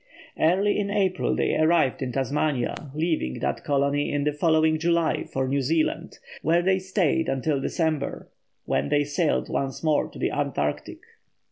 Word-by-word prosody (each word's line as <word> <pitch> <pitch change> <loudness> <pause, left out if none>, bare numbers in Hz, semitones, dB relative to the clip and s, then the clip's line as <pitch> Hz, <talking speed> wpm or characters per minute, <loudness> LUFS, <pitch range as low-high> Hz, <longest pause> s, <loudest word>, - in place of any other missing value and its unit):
Early 195 +6 +2
in 200 -1 -1
April 195 -3 0
they - - 0
arrived 155 -5 +2
at 130 -2 -3
Tasmania, 135 -1 0 0.2
leaving 155 - -1
that - - -2
colony 140 0 +1
in 145 -1 0
the 150 0 0
following 155 0 +2
July 170 0 +1
for 130 0 -2
New 140 +1 0
Zealand, 155 +4 -1 0.2
where 170 +3 +2
they 190 +1 +2
stayed 185 -4 0
until 135 +1 0
December, 155 -2 -2 0.4
when 70 +1 0
they 145 - +3
sailed 105 - 0
once 135 0 -3
more 155 -2 +2
to - - -13
the - - -1
Antarctic. 130 - -2
150 Hz, 155 wpm, -25 LUFS, 135-165 Hz, 0.4 s, they